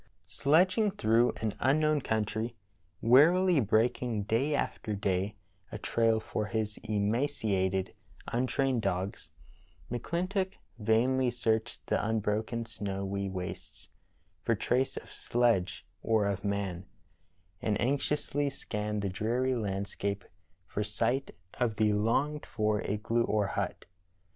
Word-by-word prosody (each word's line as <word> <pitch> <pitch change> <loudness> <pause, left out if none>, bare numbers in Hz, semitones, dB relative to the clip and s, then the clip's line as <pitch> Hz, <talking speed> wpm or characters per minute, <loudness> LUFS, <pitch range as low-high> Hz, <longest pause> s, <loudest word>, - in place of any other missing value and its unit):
Sledging 185 +9 +3
through 120 - +3
an 110 -2 0
unknown 150 +3 +3
country, 110 +1 -1 0.5
wearily 165 +8 +6
breaking 110 0 +1
day 130 +8 +1
after 105 -6 -2
day 100 0 -1 0.4
a - - -4
trail 115 -1 +2
for 105 -1 -3
his 105 -1 -2
emaciated, 105 -3 0 0.3
un 125 +2 0
trained 135 -3 +1
dogs, 95 -2 -2 0.6
McClintock 185 - -1 0.2
vainly 125 +4 +3
searched 115 -2 -1
the - - 0
unbroken 110 +2 -1
snowy 100 -2 -3
wastes 90 -1 -6 0.5
for 115 - +1
trace 125 +6 0
of - - -8
sledge 115 -7 +1 0.2
or 110 -2 +2
of 100 -2 -1
man, 100 -3 -2 0.7
and 105 -2 0
anx 135 +5 +1
iousl}^ 145 -1 0
scanned 105 -5 -3
the - - +1
dreary 120 +7 0
landscape 100 -2 -2 0.4
for 105 - -2
sight 115 +6 0 0.3
of 120 -3 +1
the 105 -1 +3
longed 135 +8 +1
for 105 -2 0
igloo 105 +3 0
or 105 -1 +1
hut. - - -3
110 Hz, 120 wpm, -30 LUFS, 105-130 Hz, 0.7 s, wearily